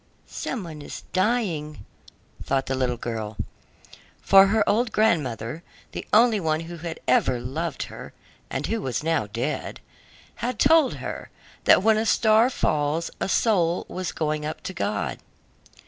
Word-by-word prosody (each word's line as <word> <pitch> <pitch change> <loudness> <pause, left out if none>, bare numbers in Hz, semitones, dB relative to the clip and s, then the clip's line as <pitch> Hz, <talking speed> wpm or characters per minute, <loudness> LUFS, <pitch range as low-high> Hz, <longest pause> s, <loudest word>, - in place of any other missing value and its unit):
"Some 245 -6 -4
one 155 -3 -8
is - - -8
dying," 185 - -1 0.6
thought 135 0 0
the 135 - -2
little 125 -2 0
girl, 110 -3 -5 0.8
for 195 0 +7
her 215 +1 +2
old 230 +2 +2
grandmother, 150 - 0 0.3
the - - -6
only 225 0 +5
one 160 -2 0
who 170 +1 -8
had 165 0 -6
ever 125 -1 +3
loved 145 +8 -3
her, - - -9 0.4
and - - -3
who 225 -1 -1
was 130 - -2
now 160 -9 0
dead, 120 +8 -3 0.6
had 245 -1 -3
told 310 +1 +4
her - - -6 0.4
that - - +6
when 220 0 +4
a 220 +1 0
star 220 +2 +4
falls, 155 - 0
a - - -2
soul 180 -6 +2
was 185 -1 -4
going 155 -1 -2
up 155 +1 -5
to 190 - -5
God. 100 - -2
165 Hz, 150 wpm, -25 LUFS, 135-215 Hz, 0.8 s, for